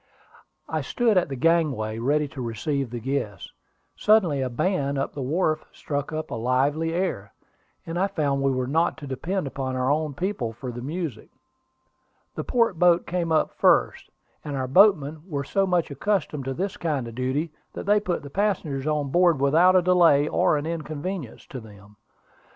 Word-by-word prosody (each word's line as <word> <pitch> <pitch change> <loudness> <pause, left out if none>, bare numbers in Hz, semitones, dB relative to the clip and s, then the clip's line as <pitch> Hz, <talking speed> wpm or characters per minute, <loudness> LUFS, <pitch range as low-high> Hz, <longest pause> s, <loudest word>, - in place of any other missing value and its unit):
I - - -2
stood 235 -3 +1
at 180 -4 +2
the 135 - -4
gangway, 135 -8 +1
ready 145 +5 +1
to 140 -4 -8
receive 125 +3 -2
the 120 +1 -5
guests. 115 -6 -3 0.4
Suddenly 185 -10 +3
a 130 - -1
band 140 +1 -1
on 135 - -1
the 140 - -5
wharf 155 +4 0
struck 145 0 -4
up 155 0 -4
a - - -3
lively 135 +7 0
air, 165 - -2 0.5
and 165 +1 -3
I 195 - +2
found 145 -8 -1
we 135 - +2
were 130 -1 0
not 160 +6 +1
to 155 - -9
depend 165 +7 -3
upon 135 -1 -4
our 130 +1 +1
own 150 -1 -1
people 145 - -2
for 125 +2 -6
the 120 0 -7
music. 150 -3 -5 1.0
The - - -4
port 230 -8 +1
boat 175 -1 +4
came 175 -2 -2
up 160 - +2
first; - - +2 0.3
and 145 -2 -4
our 130 -1 -2
boatmen 155 -2 +4
were 140 -3 -2
so 195 +7 0
much 175 -4 +1
accustomed 150 -3 -1
to 135 0 -3
this 195 +5 -3
kind 145 -7 -2
of 115 - -8
duty, 130 +6 -2 0.2
that - - -6
they 205 +1 +4
put 185 -7 -3
the 140 - -9
passengers 160 -9 -1
on 150 -2 0
board 175 -3 +4
without 160 +7 +5
delay 170 -5 +5
or 155 - +2
inconvenience 155 - -5
to 130 - -8
them. 105 -2 -15
150 Hz, 180 wpm, -25 LUFS, 130-175 Hz, 1.0 s, without